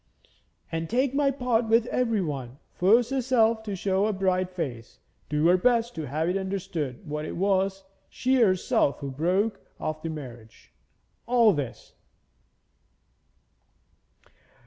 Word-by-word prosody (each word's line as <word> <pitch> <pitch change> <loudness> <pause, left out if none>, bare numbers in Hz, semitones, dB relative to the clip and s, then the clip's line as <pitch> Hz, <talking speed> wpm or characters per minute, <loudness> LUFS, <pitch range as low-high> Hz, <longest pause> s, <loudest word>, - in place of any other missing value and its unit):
'And 165 0 -3
take 255 +3 +1
my 280 0 +2
part 250 -4 0
with 225 0 +4
everyone, 160 - -2 0.2
force 230 +7 +3
herself 235 -4 +2
to 210 -3 -5
show 190 +2 +1
a 215 - 0
bright 185 -1 0
face, 135 - -6 0.3
do 150 +1 +1
her 180 +2 +6
best 235 +3 +2
to 160 -3 -5
have 155 +5 -1
it 180 - 0
understood 180 -9 -4
that 150 +1 -3
it - - -6
was 195 0 +1 0.3
she 260 +1 +1
herself 185 - +2
who 140 -1 -4
broke 185 +9 0 0.2
off 155 0 -3
the 165 - -4
marriage 120 -8 -10 0.5
all 235 -3 +5
this.' 145 -6 -6
190 Hz, 130 wpm, -26 LUFS, 155-230 Hz, 0.5 s, her